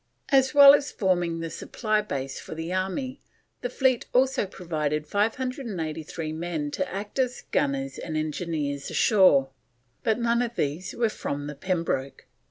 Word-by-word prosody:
As 265 Hz, 0 st, +3 dB
well 280 Hz, -1 st, +11 dB
as 285 Hz, -1 st, +2 dB
forming 175 Hz, -4 st, 0 dB
the 165 Hz, -1 st, -4 dB
supply 215 Hz, -2 st, -1 dB
base 135 Hz, -9 st, -4 dB
for -, -, -8 dB
the 165 Hz, +3 st, -4 dB
army, 195 Hz, +9 st, -2 dB, 0.4 s
the 245 Hz, -, -2 dB
fleet 255 Hz, -1 st, +1 dB
also 260 Hz, -4 st, +3 dB
provided 155 Hz, -5 st, -2 dB
583 200 Hz, -, -2 dB
men 160 Hz, -3 st, -3 dB
to 185 Hz, +3 st, -2 dB
act 205 Hz, +6 st, -5 dB
as 255 Hz, -1 st, 0 dB
gunners 135 Hz, -1 st, 0 dB
and 155 Hz, -1 st, -4 dB
engineers 155 Hz, -2 st, -2 dB
ashore; 165 Hz, -11 st, +4 dB, 0.5 s
but 220 Hz, -1 st, +1 dB
none 235 Hz, 0 st, +2 dB
of 240 Hz, -1 st, -2 dB
these 150 Hz, +3 st, -2 dB
were 235 Hz, -1 st, +2 dB
from 145 Hz, -8 st, -4 dB
the 150 Hz, -, -5 dB
Pembroke. 165 Hz, -5 st, -2 dB
180 Hz, 150 wpm, -26 LUFS, 155-235 Hz, 0.5 s, well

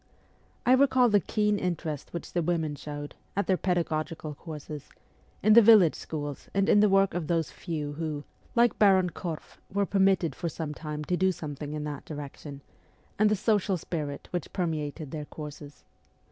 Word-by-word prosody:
I 250 Hz, -, +4 dB
recall 260 Hz, -2 st, +5 dB
the 205 Hz, -1 st, +5 dB
keen 210 Hz, +3 st, +1 dB
interest 160 Hz, -5 st, -3 dB
which 170 Hz, -, -6 dB
the 175 Hz, -, +1 dB
women 160 Hz, -2 st, 0 dB
showed, 145 Hz, 0 st, -7 dB, 0.2 s
at 200 Hz, -, +1 dB
their 190 Hz, -, +3 dB
pedagogical 160 Hz, -3 st, -1 dB
courses, 150 Hz, -1 st, -8 dB, 0.5 s
in 215 Hz, +2 st, +6 dB
the 235 Hz, -, +10 dB
village 210 Hz, -7 st, +7 dB
schools 145 Hz, -3 st, -6 dB
and 195 Hz, 0 st, +3 dB
in 205 Hz, -, +6 dB
the 210 Hz, 0 st, +5 dB
work 195 Hz, 0 st, +4 dB
of 175 Hz, -3 st, -2 dB
those 165 Hz, -2 st, 0 dB
few 150 Hz, -4 st, -4 dB
who, 150 Hz, -1 st, -4 dB, 0.3 s
like 235 Hz, 0 st, +3 dB
Baron 190 Hz, -3 st, +5 dB
Korff, 165 Hz, -3 st, -6 dB
were 200 Hz, +1 st, +1 dB
permitted 190 Hz, -6 st, +2 dB
for 170 Hz, -, -3 dB
some 155 Hz, -1 st, -5 dB
time 150 Hz, -1 st, -5 dB
to 180 Hz, -, 0 dB
do 190 Hz, +1 st, +3 dB
something 150 Hz, -3 st, -6 dB
in 150 Hz, -1 st, -3 dB
that 150 Hz, -2 st, -5 dB
direction, 145 Hz, -1 st, -8 dB, 0.6 s
and 215 Hz, 0 st, +5 dB
the 215 Hz, -, +3 dB
social 205 Hz, -2 st, +1 dB
spirit 150 Hz, -4 st, -5 dB
which 175 Hz, -3 st, -3 dB
permeated 155 Hz, -4 st, -3 dB
their 150 Hz, -2 st, -5 dB
courses. 150 Hz, -1 st, -9 dB
165 Hz, 175 wpm, -28 LUFS, 150-195 Hz, 0.6 s, the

